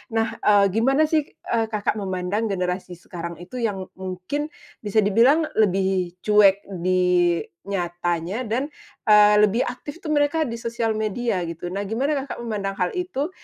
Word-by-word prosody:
Nah, 225 0 0
eee, 200 -2 +4
gimana 265 +8 +3
sih, 310 -1 +1
eee, 225 -1 -2
Kakak 210 -1 -1
memandang 190 +3 -2
generasi 180 -2 -3
sekarang 170 0 -7
itu 215 +8 -7
yang 195 -5 -2
mungkin 190 +11 -4 0.3
bisa 210 0 +1
dibilang 235 +10 +4 0.2
lebih 190 -3 +1
cuek 205 -2 +5 0.2
di 180 -1 +2 0.2
nyatanya 175 +1 -2
dan, 255 +7 -1 0.4
eee, 210 0 +7
lebih 220 +5 0
aktif 285 +6 -8
tuh 310 - -6
mereka 290 +2 +2
di 230 - -5
sosial 230 -1 -2
media, 220 -2 -1
gitu. 170 +1 -7
Nah, 200 - -2
gimana 255 +9 0
Kakak - - -7
memandang 205 -4 -3
hal 180 - +1
itu 350 -4 -2
210 Hz, 150 wpm, -23 LUFS, 185-235 Hz, 0.4 s, eee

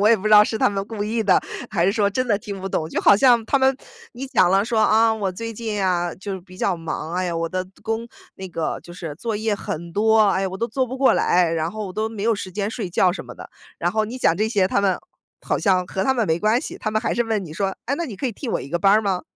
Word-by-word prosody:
我 205 - +4
也 230 - +7
不 210 -1 -5
知 - - +2
道 210 0 +9
是 220 - -3
他 - - +4
们 200 0 -3
故 220 -3 -5
意 220 +2 -1
的， 195 -3 +4 0.3
还 175 -4 +1
是 - - +4
说 205 -2 +1
真 255 +4 -1
的 205 - +3
听 200 -2 -7
不 195 - -4
懂。 160 -4 -1
就 - - -1
好 - - +6
像 240 +1 +5
他 275 - +2
们 265 0 +3 0.4
你 255 +3 -6
讲 185 -9 +3
了 195 +1 +4
说： 225 0 -1
“啊， 225 +1 +4
我 200 -4 -2
最 230 +5 -5
近 215 -2 -3
啊， 175 -2 0
就 195 0 -6
比 185 0 -15
较 185 - 0
忙。 165 0 -5
哎 185 +1 0
呀， 175 -1 -2
我 165 0 -1
的 185 +1 -3 0.2
工 225 +1 -2 0.3
那 190 - -7
个 165 -3 -3
就 175 - -12
是 170 -4 -7
作 220 +7 -4
业 215 0 0
很 170 -3 -6
多， 220 0 +4
哎 195 -1 +1
呀， 190 - 0
我 190 - -6
都 235 - -1
做 260 0 -1
不 260 +2 -6
过 270 - +4
来， 175 -1 +3
然 165 0 -1
后 215 -2 -5
我 185 - -7
都 215 +3 -1
没 220 -2 -6
有 230 0 +2
时 185 -2 -7
间 205 +2 -2
睡 210 -6 -5
觉 180 +1 +3
什 180 - -6
么 - - -10
的。” - - -11 0.3
然 175 - 0
后 215 +3 0
你 235 +4 -6
讲 170 -9 +2
这 215 +2 +1
些， 200 -5 +1
他 200 - +1
们 190 -2 +2 0.4
好 - - -1
像 185 -3 +2
和 190 +1 -2
他 265 - +3
们 235 -4 0
没 160 -1 +1
关 215 +6 +2
系， - - -7
他 215 - -3
们 215 0 0
还 235 - -1
是 240 - +1
问 220 -3 -1
你 170 - -9
说： 195 +1 -1
“哎， 280 - 0
那 340 - -2
你 250 -10 -7
可 230 - -3
以 240 - -2
替 265 - -8
我 - - -1
一 - - -8
个 175 - -1
班 195 +3 +4
儿 215 - +5
吗？” 195 -4 -1
205 Hz, 330 characters per minute, -22 LUFS, 185-225 Hz, 0.4 s, 道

